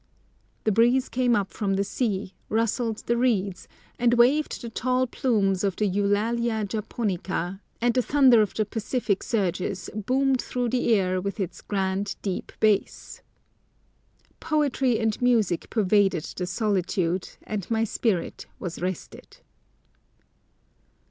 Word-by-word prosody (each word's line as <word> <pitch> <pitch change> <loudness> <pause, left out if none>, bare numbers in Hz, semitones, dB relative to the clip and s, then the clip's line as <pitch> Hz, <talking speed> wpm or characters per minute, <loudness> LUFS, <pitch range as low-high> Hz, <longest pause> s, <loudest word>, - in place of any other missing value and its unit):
The 215 - +2
breeze 240 +5 +3
came 245 -1 +2
up 200 -2 -1
from 195 -2 -1
the 195 - +1
sea, 200 -3 -2 0.2
rustled 225 0 0
the 235 - +1
reeds, 205 -7 0 0.3
and 240 0 +3
waved 265 +6 +3
the 235 - -6
tall 255 +2 +1
plumes 210 -7 0
of 195 -2 0
the 210 - 0
Eulalia 210 +3 0
japonica, 195 -3 -3 0.2
and 240 0 +2
the 255 - +3
thunder 260 -3 +5
of 210 - -1
the 215 - +1
Pacific 215 -1 -1
surges 190 -3 -2
boomed 260 +5 +1
through 245 -1 -2
the 245 0 +1
air 185 -2 +1
with 200 +2 -4
its 190 -4 -4
grand, 195 0 -2
deep 190 -3 -3
bass. 210 -2 0 1.2
Poetry 275 -6 +1
and 220 0 -1
music 220 -9 +2
pervaded 200 -5 +2
the 180 - -3
solitude, 185 -3 0
and 205 -4 -5
my 225 -1 +1
spirit 210 -5 -1
was 175 -3 -6
rested. 180 -1 -6
215 Hz, 130 wpm, -25 LUFS, 195-240 Hz, 1.2 s, thunder